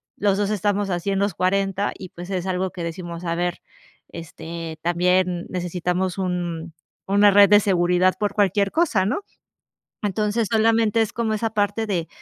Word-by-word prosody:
los 200 Hz, -1 st, +1 dB
2 205 Hz, 0 st, 0 dB
estamos 205 Hz, -1 st, 0 dB
así 175 Hz, +2 st, -2 dB
en 195 Hz, -, 0 dB
los 200 Hz, -1 st, 0 dB
cuarenta 195 Hz, +2 st, 0 dB
y, 185 Hz, -, -9 dB
pues, 175 Hz, +2 st, -10 dB
es 185 Hz, -2 st, -2 dB
algo 185 Hz, 0 st, -1 dB
que 175 Hz, -1 st, -7 dB
decimos: 170 Hz, 0 st, -6 dB
"A 170 Hz, -, -1 dB
ver, 175 Hz, +1 st, -2 dB, 0.5 s
este, 165 Hz, -1 st, -8 dB
también 180 Hz, +1 st, +1 dB
necesitamos 180 Hz, +1 st, -2 dB
un 175 Hz, -3 st, -3 dB, 0.3 s
una 205 Hz, +1 st, +5 dB
red 200 Hz, 0 st, +7 dB
de 205 Hz, -, +7 dB
seguridad 180 Hz, -1 st, +2 dB
por 205 Hz, -1 st, -1 dB
cualquier 200 Hz, 0 st, +2 dB
cosa, 270 Hz, -, +2 dB
¿no?". 310 Hz, -, -1 dB, 0.8 s
Entonces, 210 Hz, +2 st, 0 dB
solamente 225 Hz, 0 st, +3 dB
es 220 Hz, -, 0 dB
como 230 Hz, -2 st, -1 dB
esa 220 Hz, +1 st, -1 dB
parte 205 Hz, +2 st, 0 dB
de, 175 Hz, -5 st, -1 dB
190 Hz, 165 wpm, -22 LUFS, 175-205 Hz, 0.8 s, red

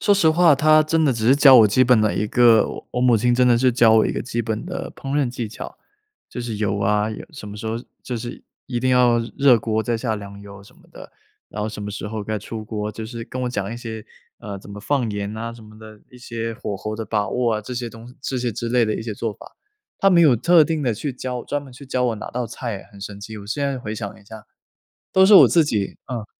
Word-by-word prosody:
说 205 Hz, -, +4 dB
实 190 Hz, -5 st, +3 dB
话 165 Hz, -1 st, +5 dB
她 155 Hz, +2 st, +5 dB
真 160 Hz, +1 st, +1 dB
的 140 Hz, -, +3 dB
只 115 Hz, -1 st, -2 dB
是 130 Hz, -, +6 dB
教 135 Hz, -3 st, +8 dB
我 110 Hz, -, +8 dB
基 105 Hz, +5 st, +3 dB
本 125 Hz, -2 st, +4 dB
的 110 Hz, -1 st, +1 dB
一 105 Hz, -, -1 dB
个 115 Hz, 0 st, +4 dB
我 -, -, -9 dB
我 125 Hz, -, -1 dB
母 125 Hz, -2 st, +4 dB
亲 120 Hz, +3 st, +2 dB
真 125 Hz, +1 st, +3 dB
的 120 Hz, -, +5 dB
是 130 Hz, 0 st, +3 dB
教 115 Hz, -2 st, +5 dB
我 110 Hz, -, +4 dB
一 -, -, -2 dB
个 -, -, -3 dB
基 120 Hz, -1 st, -3 dB
本 110 Hz, +2 st, -3 dB
的 180 Hz, -, -5 dB
烹 135 Hz, 0 st, -7 dB
饪 135 Hz, -, +1 dB
技 120 Hz, -3 st, -5 dB
巧。 105 Hz, -, -9 dB, 0.5 s
就 -, -, -7 dB
是 115 Hz, -3 st, -4 dB
油 100 Hz, -1 st, -1 dB
啊， 105 Hz, +1 st, +1 dB
盐 110 Hz, -, -7 dB
什 105 Hz, -, -9 dB
么 105 Hz, -, -8 dB
时 110 Hz, -, -7 dB
候 110 Hz, -, -2 dB, 0.3 s
就 125 Hz, -, -4 dB
是 120 Hz, +1 st, -7 dB, 0.2 s
一 120 Hz, -2 st, -3 dB
定 130 Hz, -, +1 dB
要 125 Hz, -2 st, +4 dB, 0.2 s
热 140 Hz, -4 st, +6 dB
锅 110 Hz, 0 st, -1 dB
再 115 Hz, +2 st, -1 dB
下 115 Hz, -1 st, -2 dB
凉 100 Hz, -1 st, -9 dB
油 100 Hz, -1 st, -12 dB
什 100 Hz, -, -19 dB
么 -, -, -23 dB
的， -, -, -12 dB, 0.4 s
然 105 Hz, -, -5 dB
后 110 Hz, -, -2 dB
什 105 Hz, -1 st, -8 dB
么 105 Hz, -, -5 dB
时 105 Hz, -, -6 dB
候 110 Hz, 0 st, -4 dB
该 110 Hz, +1 st, -3 dB
出 110 Hz, +2 st, -7 dB
锅， 105 Hz, -1 st, -4 dB
就 110 Hz, +1 st, -7 dB
是 115 Hz, 0 st, -7 dB
跟 130 Hz, +2 st, -6 dB
我 125 Hz, -, -1 dB
讲 100 Hz, -4 st, -3 dB
一 -, -, -6 dB
些， 110 Hz, -3 st, -7 dB, 0.3 s
呃， 100 Hz, -2 st, -7 dB
怎 100 Hz, -, -15 dB
么 100 Hz, 0 st, -8 dB
放 130 Hz, 0 st, 0 dB
盐 100 Hz, 0 st, -4 dB
啊 115 Hz, +1 st, -5 dB
什 115 Hz, -, -13 dB
么 110 Hz, 0 st, -15 dB
的， 110 Hz, -1 st, -13 dB
一 125 Hz, -, -15 dB
些 115 Hz, -2 st, -5 dB
火 100 Hz, -, -5 dB
候 110 Hz, +2 st, -5 dB
的 110 Hz, -, -4 dB
把 105 Hz, -3 st, -1 dB
握 120 Hz, -1 st, 0 dB
啊， 105 Hz, -, -2 dB
这 110 Hz, +4 st, -8 dB
些 120 Hz, -1 st, -4 dB
东 115 Hz, +2 st, -13 dB
这 135 Hz, 0 st, -3 dB
些 120 Hz, -1 st, -1 dB
之 120 Hz, +2 st, -4 dB
类 120 Hz, 0 st, +3 dB
的 110 Hz, -1 st, -1 dB
一 -, -, -5 dB
些 110 Hz, -2 st, -5 dB
做 110 Hz, +1 st, -3 dB
法。 -, -, -15 dB, 0.4 s
她 195 Hz, -, +4 dB
没 175 Hz, -2 st, +5 dB
有 150 Hz, -6 st, +6 dB
特 165 Hz, +6 st, +5 dB
定 160 Hz, -2 st, -2 dB
地 120 Hz, -4 st, +1 dB
去 135 Hz, +6 st, -4 dB
教， 125 Hz, -1 st, -5 dB
专 145 Hz, 0 st, -3 dB
门 135 Hz, -2 st, -13 dB
去 135 Hz, +3 st, -12 dB
教 130 Hz, -1 st, -1 dB
我 115 Hz, -, 0 dB
哪 -, -, -7 dB
道 125 Hz, 0 st, -2 dB
菜 115 Hz, -2 st, -5 dB
哎， -, -, -16 dB
很 100 Hz, -, -14 dB
神 100 Hz, 0 st, -8 dB
奇， 110 Hz, +1 st, -8 dB
我 100 Hz, -, -11 dB
现 140 Hz, +7 st, -2 dB
在 135 Hz, -2 st, -2 dB
回 110 Hz, -3 st, -5 dB
想 105 Hz, -3 st, -7 dB
一 -, -, -22 dB
下， 110 Hz, 0 st, -12 dB, 0.7 s
都 190 Hz, 0 st, +6 dB
是 205 Hz, -, +7 dB
我 -, -, +9 dB
自 165 Hz, -3 st, +4 dB
己 105 Hz, -8 st, -2 dB
嗯。 120 Hz, -4 st, -5 dB
115 Hz, 305 characters per minute, -21 LUFS, 105-125 Hz, 0.7 s, 我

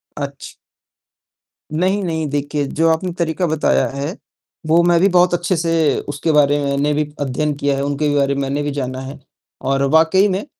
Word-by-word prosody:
अच्छ 140 Hz, -1 st, -7 dB, 1.2 s
नहीं, 190 Hz, +5 st, 0 dB
नहीं 160 Hz, -3 st, -2 dB
देखिए, 145 Hz, +1 st, -2 dB
जो 165 Hz, +4 st, +1 dB
आपने 165 Hz, +3 st, 0 dB
तरीका 170 Hz, +1 st, -1 dB
बताया 155 Hz, -1 st, +1 dB
है, 145 Hz, +9 st, -4 dB, 0.5 s
वो 165 Hz, +2 st, +4 dB
मैं 175 Hz, -1 st, +4 dB
भी 195 Hz, -, +5 dB
बहुत 180 Hz, -1 st, +3 dB
अच्छे 175 Hz, +2 st, 0 dB
से 165 Hz, -3 st, +1 dB
उसके 145 Hz, +3 st, -1 dB
बारे 145 Hz, -1 st, +3 dB
मैंने 140 Hz, +1 st, 0 dB
भी 150 Hz, 0 st, -2 dB
अध्ययन 145 Hz, +2 st, -1 dB
किया 140 Hz, 0 st, 0 dB
है। 140 Hz, -, -1 dB
उनके 145 Hz, +1 st, -1 dB
बारे 140 Hz, -1 st, +1 dB
में 140 Hz, -, -2 dB
मैंने 140 Hz, +2 st, -2 dB
भी 145 Hz, -, -2 dB
जाना 130 Hz, -2 st, -4 dB
है 135 Hz, +2 st, -8 dB, 0.4 s
और 135 Hz, 0 st, 0 dB
वाक़ई 165 Hz, +5 st, +4 dB
में 190 Hz, +5 st, -2 dB
150 Hz, 180 wpm, -18 LUFS, 140-170 Hz, 1.2 s, भी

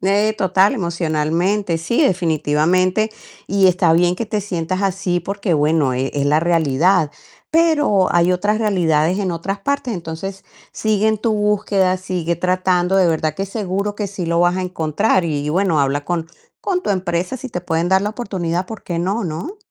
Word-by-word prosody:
Eh, 205 Hz, +3 st, +2 dB
total, 190 Hz, +3 st, +3 dB
emocionalmente, 170 Hz, -, -1 dB
sí, 235 Hz, -, 0 dB
definitivamente. 180 Hz, -, +1 dB, 0.4 s
Y 195 Hz, -1 st, +3 dB
está 175 Hz, -2 st, +3 dB
bien 175 Hz, +1 st, +3 dB
que 230 Hz, -, -3 dB
te 210 Hz, 0 st, -1 dB
sientas 185 Hz, -1 st, -3 dB
así, 190 Hz, -2 st, 0 dB
porque, 200 Hz, 0 st, -2 dB
bueno, 150 Hz, -2 st, +2 dB
e 130 Hz, +2 st, -1 dB
es 140 Hz, -1 st, 0 dB
la 150 Hz, +2 st, +3 dB
realidad. 165 Hz, 0 st, +2 dB, 0.4 s
Pero 295 Hz, -, +3 dB
hay 175 Hz, +1 st, +3 dB
otras 205 Hz, +4 st, 0 dB
realidades 180 Hz, -5 st, +1 dB
en 190 Hz, -3 st, -1 dB
otras 190 Hz, +4 st, -4 dB
partes. 260 Hz, 0 st, -2 dB
Entonces, 175 Hz, +3 st, -6 dB, 0.3 s
sigue 215 Hz, -1 st, 0 dB
en 220 Hz, -1 st, +1 dB
tu 225 Hz, 0 st, 0 dB
búsqueda, 205 Hz, -3 st, +1 dB
sigue 180 Hz, -2 st, -2 dB
tratando, 185 Hz, +1 st, +1 dB
de 185 Hz, -2 st, +4 dB
verdad 155 Hz, -2 st, 0 dB
que 195 Hz, +1 st, -3 dB
seguro 200 Hz, 0 st, -3 dB
que 205 Hz, -1 st, -3 dB
sí 190 Hz, -3 st, -5 dB
lo 170 Hz, +1 st, +1 dB
vas 175 Hz, +1 st, +3 dB
a 185 Hz, -, -1 dB
encontrar. 180 Hz, +2 st, 0 dB
Y 150 Hz, -2 st, -2 dB
bueno, 180 Hz, -1 st, +1 dB
habla 140 Hz, +1 st, 0 dB
con 170 Hz, -1 st, -2 dB, 0.3 s
con 370 Hz, -2 st, -1 dB
tu 285 Hz, -, -3 dB
empresa 185 Hz, +2 st, -1 dB
si 260 Hz, +1 st, -7 dB
te 180 Hz, -7 st, -4 dB
pueden 165 Hz, 0 st, -1 dB
dar 190 Hz, +1 st, +3 dB
la 210 Hz, -, -1 dB
oportunidad, 185 Hz, -6 st, -3 dB
¿por 220 Hz, 0 st, -9 dB
qué 170 Hz, -2 st, -3 dB
no, 195 Hz, +4 st, -1 dB
no? 180 Hz, -, -5 dB
185 Hz, 180 wpm, -19 LUFS, 165-200 Hz, 0.4 s, de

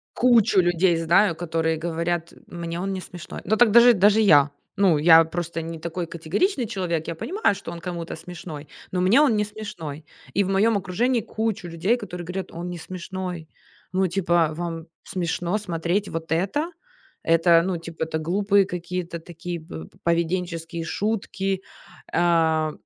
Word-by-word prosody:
Кучу 235 Hz, -6 st, +4 dB
людей 175 Hz, 0 st, +2 dB
знаю, 170 Hz, +3 st, +3 dB
которые 160 Hz, -1 st, -1 dB
говорят 170 Hz, +1 st, -2 dB
мне: 170 Hz, 0 st, -5 dB
"Он 195 Hz, +2 st, -2 dB
не 190 Hz, -, -4 dB
смешной". 180 Hz, -1 st, -9 dB
Ну, 220 Hz, +4 st, +2 dB
так 240 Hz, -2 st, +5 dB
даже 235 Hz, +2 st, +8 dB
даже 205 Hz, +1 st, +4 dB
я, 145 Hz, -8 st, +6 dB, 0.3 s
ну, 190 Hz, -6 st, +4 dB
я 165 Hz, +1 st, +8 dB
просто 170 Hz, 0 st, -4 dB
не 165 Hz, 0 st, -6 dB
такой 170 Hz, +2 st, -4 dB
категоричный 235 Hz, -, -1 dB
человек, 170 Hz, -5 st, -2 dB
я 165 Hz, -, -3 dB
понимаю, 360 Hz, -, 0 dB
что 195 Hz, -3 st, -8 dB
он 170 Hz, -, -7 dB
кому-то 170 Hz, -1 st, -5 dB
смешной, 160 Hz, -3 st, -9 dB, 0.2 s
но 180 Hz, -, 0 dB
мне 205 Hz, +10 st, +5 dB
он 275 Hz, -7 st, +4 dB
не 210 Hz, -, +2 dB
смешной. 175 Hz, -9 st, -8 dB, 0.3 s
И 200 Hz, -, +3 dB
в 190 Hz, -, -3 dB
моём 205 Hz, +3 st, +3 dB
окружении 225 Hz, +6 st, 0 dB
кучу 220 Hz, -3 st, -3 dB
людей, 175 Hz, +8 st, 0 dB
которые 180 Hz, -7 st, -7 dB
говорят: 185 Hz, +2 st, -5 dB
"Он 175 Hz, +2 st, -6 dB
не 175 Hz, -, -5 dB
смешной". 180 Hz, -1 st, -6 dB, 0.4 s
Ну 190 Hz, +1 st, +2 dB
типа, 175 Hz, -3 st, +1 dB
вам 165 Hz, 0 st, -5 dB, 0.2 s
смешно 175 Hz, +1 st, -2 dB
смотреть 185 Hz, 0 st, -2 dB
вот 165 Hz, 0 st, -5 dB
это? 200 Hz, -, 0 dB, 0.5 s
Это, 165 Hz, 0 st, +5 dB
ну 185 Hz, -1 st, -1 dB
типа, 165 Hz, -1 st, -6 dB
это 160 Hz, 0 st, -2 dB
глупые 195 Hz, +4 st, +2 dB
какие-то 180 Hz, -1 st, -5 dB
такие 170 Hz, +1 st, -7 dB
пов 80 Hz, -, -9 dB, 0.2 s
поведенческие 170 Hz, 0 st, -1 dB
шутки, 195 Hz, 0 st, -2 dB, 0.5 s
э. 160 Hz, -2 st, +2 dB
175 Hz, 160 wpm, -24 LUFS, 165-195 Hz, 0.5 s, даже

